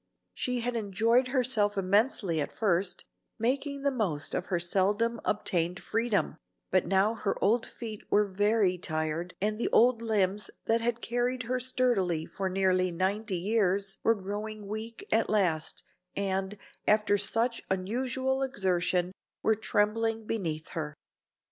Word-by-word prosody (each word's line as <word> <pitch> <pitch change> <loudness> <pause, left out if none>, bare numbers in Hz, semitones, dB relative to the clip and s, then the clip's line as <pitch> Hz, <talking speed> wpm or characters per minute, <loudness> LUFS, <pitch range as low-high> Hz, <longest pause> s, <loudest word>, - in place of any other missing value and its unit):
She 250 -1 -2
had 245 +1 -2
enjoyed 230 +4 +2
herself 240 -6 +1
immensely 195 - +2
at - - -3
first, 190 -3 0 0.3
making 275 +4 -1
the 280 - +2
most 190 - -1
of 180 - -2
her 180 - 0
seldom 205 +6 +1
obtained 180 -3 -1
freedom, 225 -3 0 0.3
but 185 -2 +2
now 195 +4 +3
her 215 -3 -2
old 225 +3 +2
feet 220 -3 -7
were 210 0 +4
very 200 -1 +2
tired 155 +1 -2
and 215 +2 -1
the - - 0
old 235 0 +4
limbs 210 -3 0 0.2
that 230 +1 +2
had 235 0 -1
carried 245 +1 -1
her 250 +2 -1
sturdily 235 -10 +1
for 195 -1 -3
nearly 185 -1 +2
ninety 190 +3 -1
years 195 0 0
were 225 - +3
growing 210 +2 -5
weak 220 +3 -5
at 225 +1 +3
last, 175 -7 +1 0.3
and, 195 0 -1 0.3
after 210 -1 +4
such 225 +4 +1
unusual 255 +7 -1
exertion, 185 -7 +1 0.3
were 220 - +4
trembling 220 +1 0
beneath 165 -8 -3
her. 150 -3 -4
210 Hz, 140 wpm, -29 LUFS, 185-230 Hz, 0.3 s, were